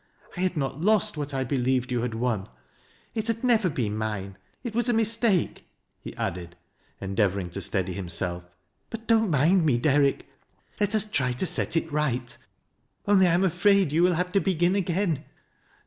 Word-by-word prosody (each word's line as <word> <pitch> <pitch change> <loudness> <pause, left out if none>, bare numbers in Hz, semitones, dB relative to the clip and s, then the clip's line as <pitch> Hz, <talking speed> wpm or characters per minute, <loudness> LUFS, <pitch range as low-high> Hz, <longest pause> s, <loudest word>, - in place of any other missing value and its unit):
I - - -7
had 180 -2 0
not 140 +1 -3
lost 210 -1 +2
what 145 -1 -4
1. 135 -1 -2
believed 125 0 0
you 120 -2 0
had 120 -2 -3
won. 115 - -2 0.6
It 220 0 -1
had 230 +1 -2
never 225 -6 +3
been 110 -8 -2
mine. 105 -3 -4 0.3
It 235 -4 -5
was 240 +2 0
a - - +3
mistake," 225 -4 +1 0.4
lie - - -7
added, 85 -1 -4 0.4
endeavoring 95 -2 -1
to 100 - -4
steady 95 0 0
himself. 90 -1 -4 0.3
" 80 - -47
Bu! 225 - -5
don't 225 -2 +3
mind 165 +5 +3
me, 140 -7 +2
Derrick. 140 +1 +2 0.5
Let 205 +1 +2
us 215 - +2
try 135 -12 -1
to 125 - -2
set 170 - 0
it 165 -1 -2
right; 130 -5 -1 0.7
only 200 -2 +5
1 175 - +3
am 180 - +2
afraid 190 -1 +3
you 160 +3 +2
will 180 0 +4
have 180 +2 -1
to 195 - +3
begin 180 -2 +1
again." 175 -5 0
150 Hz, 180 wpm, -26 LUFS, 120-195 Hz, 0.7 s, only